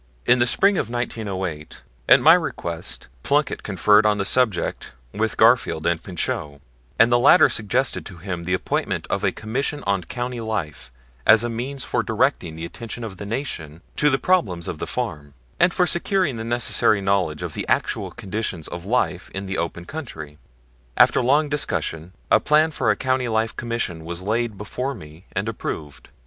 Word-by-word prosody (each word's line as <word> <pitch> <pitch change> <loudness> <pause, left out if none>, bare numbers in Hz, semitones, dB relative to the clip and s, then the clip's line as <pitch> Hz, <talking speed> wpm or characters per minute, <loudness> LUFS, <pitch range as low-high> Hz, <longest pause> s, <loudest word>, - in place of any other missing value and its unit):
In 125 - +4
the 120 - +3
spring 195 +9 +4
of - - -2
1908, 95 -10 -4 0.3
at - - +8
my - - +8
request, 85 0 -2
Plunkett 145 - 0
conferred 105 +2 +4
on 105 -1 +2
the 100 - -1
subject 105 - 0 0.2
with - - -1
Garfield 80 - +3
and 85 -1 +1
Pinchot, 75 -5 -3 0.4
and 115 +1 +5
the 120 - +5
latter 130 - +7
suggested 105 -4 0
to 90 - -11
him 90 0 -5
the 90 +2 0
appointment - - -2
of - - -1
a - - +2
Commission 135 +7 -3
on 100 -2 +1
Country 120 +6 -4
Life 100 - -4 0.4
as 110 +1 +7
a 120 - -1
means 130 +4 -4
for - - 0
directing 80 -2 0
the 80 +1 -6
attention 115 +6 -7
of 100 -4 -7
the 100 - -7
Nation 85 - -5
to 150 - +4
the 135 - +2
problems 100 - +1
of 80 - -5
the - - -4
farm, 80 - -4 0.2
and - - +5
for 180 - +2
securing 175 - +1
the 110 - -5
necessary 115 -2 +2
knowledge 95 -6 0
of - - -5
the - - -4
actual - - 0
conditions 95 -5 -4
of 85 +1 -7
life 105 -6 0
in 95 +1 -4
the 95 -1 -3
open 85 +1 -4
country. 80 - -8 0.6
After - - +5
long 145 +5 +3
discussion 90 - -2 0.2
a - - +6
plan 155 +1 +3
for - - 0
a - - +4
Country 130 -1 0
Life 110 0 0
Commission 115 -9 -3
was 85 +2 -4
laid 110 +1 -1
before 125 +7 -4
me 80 -2 -13
and - - -2
approved. 75 -3 -6
105 Hz, 180 wpm, -22 LUFS, 85-125 Hz, 0.6 s, at